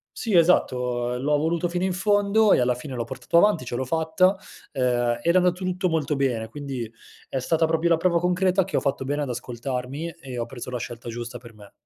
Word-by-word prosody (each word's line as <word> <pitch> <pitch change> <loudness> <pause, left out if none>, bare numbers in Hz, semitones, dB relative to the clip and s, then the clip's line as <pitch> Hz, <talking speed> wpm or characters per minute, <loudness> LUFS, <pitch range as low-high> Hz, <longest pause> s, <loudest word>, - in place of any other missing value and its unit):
Sì, 225 -4 -3
esatto. 125 -8 +2
Ehm, 125 - -4
l'ho 150 +1 +2
voluto 165 +3 0
fino 175 +1 -2
in 190 -1 0
fondo 205 +2 +3
e - - +4
alla 125 0 +2
fine 130 +1 -7
l'ho 120 - -2
portato 125 +7 -1
avanti, 170 -7 +4
ce 120 - -4
l'ho 130 +2 -2
fatta. 160 +6 +2 0.4
Ehm, 120 -3 +1
era 170 +2 +3
andato 180 0 +2
tutto 185 0 0
molto 155 -3 0
bene, 125 -5 0
quindi 130 -4 -5 0.4
è 135 - -2
stata 160 +5 +1
proprio 165 +1 +1
la 165 - +5
prova 170 0 +2
concreta 180 +2 +2
che 190 - -2
ho - - +4
fatto 135 -1 -2
bene 145 +2 -1
ad 140 - -4
ascoltarmi 125 +5 -4
e 130 -4 -8
ho 115 - -1
preso 125 0 -8
la 125 - -3
scelta 120 0 -7
giusta 120 +1 -6
per 115 -1 -14
me. 105 -2 -15
140 Hz, 225 wpm, -24 LUFS, 125-175 Hz, 0.4 s, la